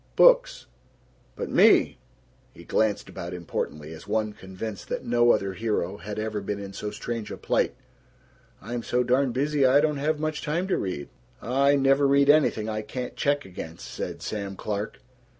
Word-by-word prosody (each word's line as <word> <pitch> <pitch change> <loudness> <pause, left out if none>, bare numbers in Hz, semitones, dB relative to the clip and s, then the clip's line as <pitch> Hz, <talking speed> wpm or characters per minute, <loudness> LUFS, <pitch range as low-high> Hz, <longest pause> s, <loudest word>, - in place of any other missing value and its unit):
Books. - - +5 0.7
But - - -5
me," - - +5 0.6
he - - -12
glanced 110 -2 0
about 85 +1 -6
importantly, 80 -3 -4
as 80 - -12
one 110 0 0
convinced 95 +1 -7
that - - -3
no 120 0 +3
other 100 -4 +2
hero 105 -3 -2
had 100 +3 -7
ever 110 -1 -2
been 100 +1 -3
in 100 -1 -7
so 105 +1 -4
strange 115 0 -5
a - - -6
plight, - - 0 0.9
"I'm 120 +3 -4
so 125 +1 0
darn 125 +2 +2
busy 140 +3 +1
I 130 +2 +6
don't 150 -1 +1
have 150 +2 0
much 155 0 -2
time 170 +5 -1
to - - +3
read." 90 -7 -4 0.3
"I 140 +4 +3
never 135 0 +4
read 140 +1 +6
anything 140 -8 +2
I 110 -1 -2
can't 125 +3 -6
check 145 0 0
against," 85 -2 -8
said - - -5
Sam 100 -2 -4
Clark. 105 +1 -4
115 Hz, 170 wpm, -26 LUFS, 100-140 Hz, 0.9 s, I